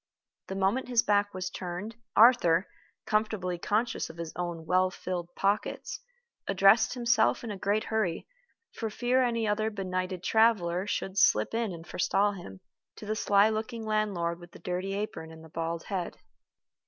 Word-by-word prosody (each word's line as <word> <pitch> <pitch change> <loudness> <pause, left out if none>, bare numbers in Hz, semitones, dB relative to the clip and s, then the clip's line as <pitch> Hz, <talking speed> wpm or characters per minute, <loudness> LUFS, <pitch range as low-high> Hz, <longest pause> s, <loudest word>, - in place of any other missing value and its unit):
The 190 - -5
moment 195 +7 +1
his 240 -2 +3
back 205 0 +2
was 185 -1 -4
turned, 185 +5 -6 0.2
Arthur, 210 -7 +5 0.4
comfortably 215 -5 -1
conscious 220 +6 -1
of 160 - -11
his 165 -1 -6
own 175 -2 -4
well 185 +3 +3
filled 180 -2 -5
pockets, 200 +2 -1 0.5
addressed 195 +5 +4
himself 240 -2 +2
in 230 - -4
a - - -4
great 200 +3 0
hurry, 215 -7 -1 0.5
for 225 - -4
fear 245 +4 +1
any 230 -3 0
other 215 +1 +1
benighted 185 -3 -3
traveler 195 -5 +2
should 195 -1 -2
slip 110 - +3
in 230 -3 -1
and 165 -1 -9
forestall 195 +4 +1
him, 95 - -10 0.3
to - - -10
the 215 +1 -1
sly 205 -1 +4
looking 220 +1 -4
landlord 200 -6 -1
with 175 -1 -14
the - - -11
dirty 185 +2 -3
apron 160 -6 -5
and 160 0 -12
the 160 - -13
bald 165 +1 -3
head. 185 -3 -4
195 Hz, 165 wpm, -29 LUFS, 175-220 Hz, 0.5 s, Arthur